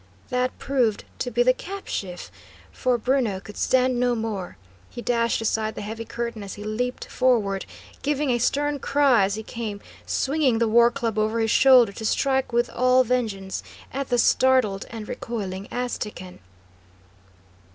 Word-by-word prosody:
That 250 +1 -1
proved 245 -6 0 0.2
to 245 - -2
be 245 0 +2
the 255 +1 +5
cap 390 +8 -8
sheaf, 180 -3 -5 0.4
for 250 -1 0
Bruno 240 -5 0
could 205 +2 -12
stand 255 -1 +2
no 245 -1 +2
more. 215 -5 -4 0.3
He - - -9
dashed 235 -1 0
aside 220 0 -1
the - - -5
heavy 225 +2 -6
curtain 235 -2 -4
as 195 -2 -7
he 205 - -8
leaped 245 +4 -3
forward, 210 -7 +1 0.3
giving 290 -1 0
a 240 - +1
stern 290 +4 0
cry 275 -8 +3
as 200 +1 -2
he 220 - -6
came, 220 -3 -5 0.3
swinging 275 -4 +1
the 230 0 +2
war 235 +2 +6
club 235 -4 -2
over 220 +2 +1
his 225 -1 +1
shoulder 255 -5 +6
to 210 - -9
strike 265 +4 +1
with 240 +1 +2
all 255 +1 +4
vengeance 220 -6 -2 0.3
at 275 0 -3
the 245 - +2
startled 240 -5 +3
and 220 -2 -7
recoiling 200 -4 -5
Aztecan. 210 -7 -5
235 Hz, 160 wpm, -24 LUFS, 215-255 Hz, 0.4 s, war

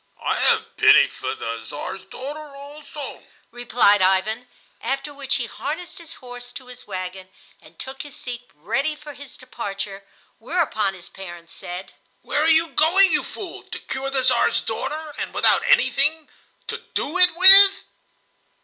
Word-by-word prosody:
"I - - 0
have - - +1
pity - - +7
for - - -5
the 115 0 -5
Czar's 185 - -7
daughter 290 +2 -9
also," 290 +1 -9 0.3
replied 240 -4 +3
Ivan, 195 +6 +1 0.3
after 275 +2 -3
which 280 -2 -2
he - - -1
harnessed 355 -1 -6
his 335 -1 -9
horse 245 -1 -11
to 260 - -9
his 250 0 -13
wagon 185 -1 -6 0.3
and - - -19
took 265 0 -6
his 290 -2 -10
seat 245 -1 -8
ready 250 - -1
for 300 -1 -11
his 285 -2 -11
departure; 200 -5 -6 0.4
whereupon 225 - -1
his 175 - -12
parents 175 -3 -11
said: 180 +2 -7 0.3
"Where 295 - -1
are 315 - +2
you 325 +1 +4
going, 375 +6 +4
you - - +1
fool—to 385 -5 -8
cure 270 +1 -5
the 270 -1 0
Czar's - - +2
daughter, 310 0 -5
and - - -5
without - - +4
anything 320 - +3 0.4
to - - -4 0.2
do 340 +6 -1
it 360 -2 +6
with?" 390 +2 +9
270 Hz, 155 wpm, -22 LUFS, 200-310 Hz, 0.4 s, with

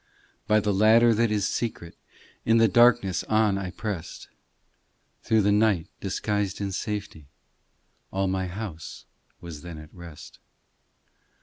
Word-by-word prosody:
By 110 0 +4
the 105 -1 0
ladder 110 +4 +5
that 115 +1 +1
is 105 -2 0
secret, 95 -8 -4 0.5
In 115 0 +3
the 115 0 +5
darkness 110 -4 +3
on 110 -2 +2
I 95 -2 -4
pressed, 100 -4 -6 0.9
Through 110 -2 +2
the 105 - +3
night, 105 -5 +2
disguised 100 0 -2
in 100 -1 -3
safety, 100 -6 -5 0.8
All 95 0 -1
my 95 0 -1
house 90 -3 -8 0.4
was 85 -4 -9
then 85 -2 -9
at 75 0 -13
rest. 85 -4 -12
100 Hz, 130 wpm, -25 LUFS, 90-110 Hz, 0.9 s, ladder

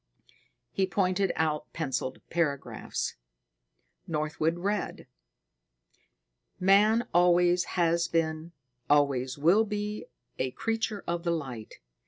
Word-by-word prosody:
He 190 -1 0
pointed 190 0 +1
out 155 -2 -1
penciled 135 -4 -3
paragraphs. 155 -5 -2 0.9
Northwood 155 +1 -1
read: 200 +3 -2 1.5
Man 210 +5 +4
always 175 0 +4
has 170 0 +2
been, 160 0 -1 0.4
always 140 -3 +2
will 175 +9 +4
be 210 0 -4 0.3
a 130 - 0
creature 225 - -2
of 170 0 -2
the 170 - -2
light. 130 -10 -4
170 Hz, 95 wpm, -28 LUFS, 150-195 Hz, 1.5 s, Man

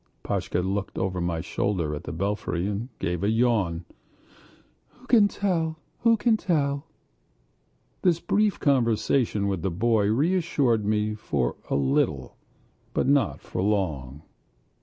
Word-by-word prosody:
Pashka 90 - -1
looked 95 +2 -3
over 95 -1 -1
my 85 -2 -1
shoulder 85 -4 -1
at 75 +3 -6
the - - -5
belfry 95 0 -2
and 105 +5 -3
gave 90 0 -2
a 100 - +2
yawn. 110 -8 +1 1.2
"Who 200 0 +2
can 220 +1 +3
tell?" 145 -5 0 1.1
This 175 -3 +3
brief 210 +2 +1
conversation 115 -4 +2
with 95 -4 -1
the 95 - 0
boy 105 +3 +2
reassured 140 - +1
me 105 0 +1
for 70 - -1
a - - +1
little, 65 -1 0 0.6
but - - +1
not 140 0 +2
for - - -4
long. 80 -9 -1
105 Hz, 120 wpm, -26 LUFS, 90-140 Hz, 1.2 s, can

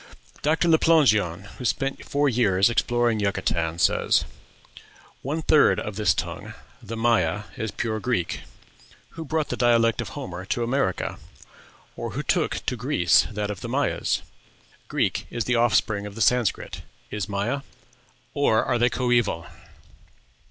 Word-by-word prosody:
Dr. 160 +3 +2
Le 160 -1 +5
Plongeon, 105 - +3 0.2
who - - -6
spent 135 +2 -1
four 145 +1 +1
years 105 -5 +3
exploring 120 -1 +1
Yucatan, 90 -5 -1
says: 85 - +2 1.0
"One 155 +4 -3
third 150 - +4
of 105 - -5
this 105 0 +2
tongue - - -5 0.3
(the 115 0 -7
Maya) 105 -5 +1
is 110 -2 -3
pure 110 +1 -3
Greek. 100 -7 -1 0.7
Who 165 - -7
brought 155 0 -1
the - - -2
dialect 115 -2 +3
of - - -6
Homer 90 0 -6
to 120 +5 -1
America? 120 -6 -1 0.8
or - - -5
who - - -3
took - - 0
to - - -1
Greece - - +3
that 105 -1 -3
of 100 - -7
the - - -5
Mayas? - - 0 0.6
Greek - - -1
is 120 - -2
the 125 +4 0
offspring 110 -3 +2
of 100 - -10
the 115 - -5
Sanscrit. 120 +1 +1 0.3
Is 105 -1 -3
Maya? 105 +8 -1 0.7
or 115 -6 +2
are 120 - 0
they 120 +1 +4
coeval?... 120 -9 0
115 Hz, 145 wpm, -24 LUFS, 100-125 Hz, 1.0 s, Le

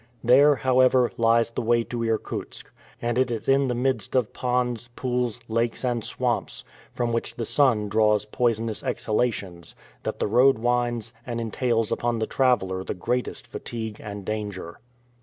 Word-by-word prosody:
There, 140 +5 +6
however, 130 0 +3
lies 115 0 +3
the - - -3
way 120 0 +2
to 120 0 -4
Irkutsk, 115 -1 -3 0.3
and 120 +1 0
it 130 -1 +2
is 115 -2 -4
in 135 0 +4
the 125 - -1
midst 125 -4 -1
of 125 -4 +1
ponds, 125 -2 -1
pools, 125 -3 -1
lakes, 115 +2 -1
and 120 -2 0
swamps, - - -2 0.3
from 120 -1 -2
which 115 0 -2
the 115 - -3
sun 115 -5 +2
draws 105 0 +2
poisonous 115 0 -1
exhalations, 100 -7 -2 0.3
that - - -4
the - - +1
road 125 +5 +4
winds, 120 -1 -1
and 120 -1 -4
entails 115 0 0
upon 120 -1 0
the 110 - 0
traveler 95 -9 +1
the - - -4
greatest 120 +7 -2
fatigue 110 -2 -6
and 100 -2 -7
danger. 105 -5 -5
115 Hz, 160 wpm, -25 LUFS, 110-125 Hz, 0.3 s, There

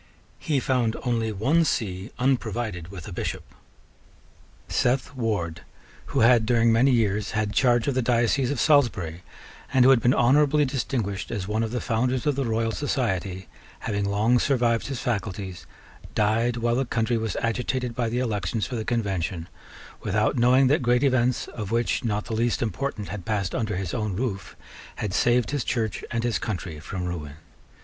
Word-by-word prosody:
He 145 -3 0
found 125 -3 0
only 115 -3 0
one 135 +12 +2
see 100 - -2
unprovided 120 -8 -1
with 90 -3 -9
a - - -7
Bishop. - - -4 1.2
Seth 125 +3 0
Ward, 95 -9 -2 0.5
who - - 0
had 115 -1 +5
during 115 -1 +4
many 120 +5 +4
years 105 -4 +1
had 105 -1 0
charge 120 -2 +3
of 140 - +2
the 130 - +1
diocese 120 +2 +2
of 140 -3 -2
Salisbury, 95 - +2 0.5
and 130 -2 +5
who 135 - +8
had 125 -3 +5
been 125 - +3
honourably 145 +4 +4
distinguished 120 -7 -2
as 100 -5 -3
one 110 +2 0
of 115 - -1
the 125 +2 -2
founders 125 +1 0
of 145 -2 +2
the 135 -1 -1
Royal 115 0 0
Society, 95 - -2 0.3
having 100 -3 -2
long 105 +5 +2
survived 120 -4 +1
his 135 -3 -4
faculties, 100 -6 -4 0.5
died 115 +3 +2
while 120 0 +1
the 130 +3 +1
country 115 0 0
was 110 -3 -3
agitated 125 +1 -1
by 115 -1 -1
the 120 - -2
elections 110 -2 -1
for 130 - -7
the 110 - -2
Convention, 95 -7 -2 0.5
without 105 +5 +1
knowing 125 +2 +5
that 140 +3 +3
great 125 +1 +2
events, 125 -2 +2
of 105 -4 -6
which 115 +1 0
not 105 -3 -1
the 115 - -5
least 115 +2 +1
important 115 -2 -3
had 100 -3 -6
passed 100 -2 -2
under 110 -4 -1
his 90 -2 -3
own 105 -5 -2
roof, 100 -5 -3 0.4
had 105 -4 -3
saved 120 +3 +2
his 145 -4 -1
Church 110 -4 -2
and 115 -1 -2
his 115 -6 0
country 90 -7 -4
from 90 +3 -5
ruin. 80 -5 -5
115 Hz, 175 wpm, -25 LUFS, 105-125 Hz, 1.2 s, who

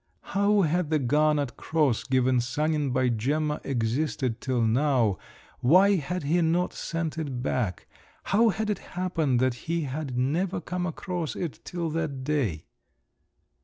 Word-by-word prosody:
How 200 +1 +3
had 165 0 +1
the 155 - +3
garnet 145 -1 +1
cross 150 -7 +1
given 130 -1 +2
Sanin 150 +3 0
by 130 0 +2
Gemma 150 +7 0
existed 125 0 -1
till 125 -3 0
now, 120 -3 +2 0.4
why 190 +9 +5
had 180 +3 -3
he 165 +5 +2
not 170 +2 +1
sent 165 -1 -3
it 135 -6 -4
back, 115 -9 -1 0.4
how 225 +3 +3
had 215 +2 -1
it 205 - -2 0.2
happened 165 -8 +1
that 130 -1 +2 0.2
he 170 0 +1
had 140 -2 -4
never 170 +9 0
come 180 +1 -3
across 175 -1 -4
it 170 -5 -4
till 170 -3 -3
that 150 -5 -3
day? 130 - -1
150 Hz, 145 wpm, -27 LUFS, 130-170 Hz, 0.4 s, why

